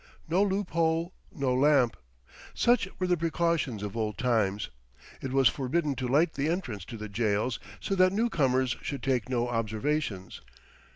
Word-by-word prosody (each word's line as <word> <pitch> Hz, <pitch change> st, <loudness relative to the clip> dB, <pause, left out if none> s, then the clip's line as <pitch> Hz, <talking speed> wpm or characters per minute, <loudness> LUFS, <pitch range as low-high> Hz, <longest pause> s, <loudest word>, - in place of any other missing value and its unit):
No 175 Hz, +5 st, +2 dB
loophole, 170 Hz, -4 st, 0 dB, 0.2 s
no 135 Hz, -4 st, -1 dB
lamp. 135 Hz, -2 st, +4 dB, 0.6 s
Such 240 Hz, -5 st, +3 dB
were 185 Hz, -, -1 dB
the 180 Hz, -1 st, +3 dB
precautions 165 Hz, -, 0 dB
of 105 Hz, 0 st, -5 dB
old 110 Hz, -2 st, -2 dB
times. 105 Hz, -, 0 dB, 0.5 s
It 135 Hz, -, -4 dB
was 135 Hz, -1 st, +5 dB
forbidden 145 Hz, +4 st, 0 dB
to 130 Hz, -, -2 dB
light 155 Hz, +6 st, +3 dB
the 145 Hz, +3 st, -1 dB
entrance 130 Hz, -, -3 dB
to 115 Hz, -, -8 dB
the 110 Hz, 0 st, -6 dB
jails, 105 Hz, +2 st, 0 dB, 0.2 s
so -, -, -2 dB
that 185 Hz, -1 st, +5 dB
the 190 Hz, -, -5 dB
newcomers 130 Hz, -, +1 dB
should 140 Hz, -3 st, -5 dB
take 130 Hz, -3 st, 0 dB
no 120 Hz, -1 st, 0 dB
observations. 115 Hz, -2 st, -2 dB
135 Hz, 160 wpm, -29 LUFS, 115-170 Hz, 0.6 s, was